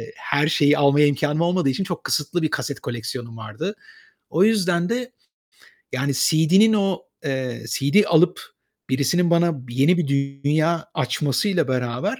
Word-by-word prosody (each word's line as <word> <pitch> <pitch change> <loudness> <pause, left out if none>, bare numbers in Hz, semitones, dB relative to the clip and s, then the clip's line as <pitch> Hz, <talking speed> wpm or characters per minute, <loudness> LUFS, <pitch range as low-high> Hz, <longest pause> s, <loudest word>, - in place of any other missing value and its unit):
her 150 - 0
şeyi 150 -1 +3
almaya 145 +1 +4
imkânım 150 +2 0
olmadığı 175 -3 +1
için 135 +8 -1
çok 180 -3 -5
kısıtlı 165 +4 -1
bir 155 - -1
kaset 140 - -3
koleksiyonum 115 0 -6
vardı. 110 - -6 0.6
O 175 +5 +3
yüzden 180 -5 +1
de 245 +2 -3 0.8
yani 140 +2 -1
CD'nin 175 +10 +4
o, 195 -3 0 0.2
eee, 130 -4 -3
CD 145 - +2
alıp 170 +2 +3 0.5
birisinin 170 +6 +1
bana 170 -7 +1
bir 120 - -9
yeni 145 +8 +3
bir 175 -5 -1 0.4
dünya 155 +3 +1
açmasıyla 145 - 0
beraber 130 - -2
155 Hz, 145 wpm, -22 LUFS, 135-180 Hz, 0.8 s, almaya